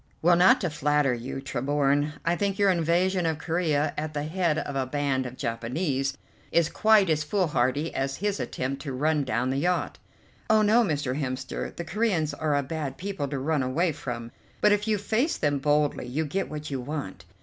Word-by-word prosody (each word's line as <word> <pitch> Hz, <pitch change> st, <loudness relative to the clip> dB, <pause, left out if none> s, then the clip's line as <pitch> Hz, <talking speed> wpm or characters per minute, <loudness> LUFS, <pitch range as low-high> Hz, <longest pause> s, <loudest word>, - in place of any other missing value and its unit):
"Well, 175 Hz, +1 st, +6 dB
not 185 Hz, +9 st, +6 dB
to 175 Hz, -5 st, -1 dB
flatter 150 Hz, -2 st, +2 dB
you, 125 Hz, +3 st, -5 dB
Tremorne, 145 Hz, +2 st, 0 dB
I 170 Hz, +1 st, +2 dB
think 195 Hz, +1 st, -1 dB
your 200 Hz, -1 st, +4 dB
invasion 175 Hz, +1 st, +1 dB
of 160 Hz, -2 st, 0 dB
Corea 160 Hz, -3 st, 0 dB
at 155 Hz, 0 st, -4 dB
the 145 Hz, -, -1 dB
head 165 Hz, 0 st, 0 dB
of 145 Hz, -, -3 dB
a 135 Hz, -1 st, 0 dB
band 135 Hz, -2 st, -1 dB
of 125 Hz, +1 st, -10 dB
Japanese 135 Hz, +4 st, -2 dB, 0.3 s
is 170 Hz, -1 st, +3 dB
quite 215 Hz, -2 st, +4 dB
as 155 Hz, -2 st, +1 dB
foolhardy 150 Hz, -4 st, 0 dB
as 135 Hz, 0 st, -1 dB
his 205 Hz, +3 st, -2 dB
attempt 135 Hz, +2 st, -3 dB
to 135 Hz, -1 st, -5 dB
run 150 Hz, +3 st, +1 dB
down 125 Hz, 0 st, 0 dB
the 135 Hz, -, -1 dB
yacht." 180 Hz, +4 st, -1 dB, 0.5 s
"Oh, 215 Hz, 0 st, +5 dB
no, 220 Hz, +3 st, +5 dB
Mr. 145 Hz, -, -1 dB
Hemster; 130 Hz, -2 st, -4 dB
the 170 Hz, -, -5 dB
Coreans 175 Hz, -6 st, 0 dB
are 150 Hz, 0 st, 0 dB
a 140 Hz, -, 0 dB
bad 140 Hz, -2 st, -4 dB
people 190 Hz, -4 st, -3 dB
to 140 Hz, 0 st, -3 dB
run 145 Hz, +2 st, 0 dB
away 155 Hz, +7 st, +1 dB
from, 120 Hz, -5 st, -6 dB, 0.3 s
but 210 Hz, -, +4 dB
if 205 Hz, +1 st, +1 dB
you 215 Hz, -1 st, +2 dB
face 225 Hz, -, 0 dB
them 145 Hz, -1 st, 0 dB
boldly 145 Hz, -2 st, +1 dB
you 150 Hz, +6 st, -1 dB
get 190 Hz, +7 st, -2 dB
what 150 Hz, -1 st, -6 dB
you 135 Hz, -2 st, -2 dB
want. 125 Hz, -, -6 dB
150 Hz, 195 wpm, -26 LUFS, 135-175 Hz, 0.5 s, Well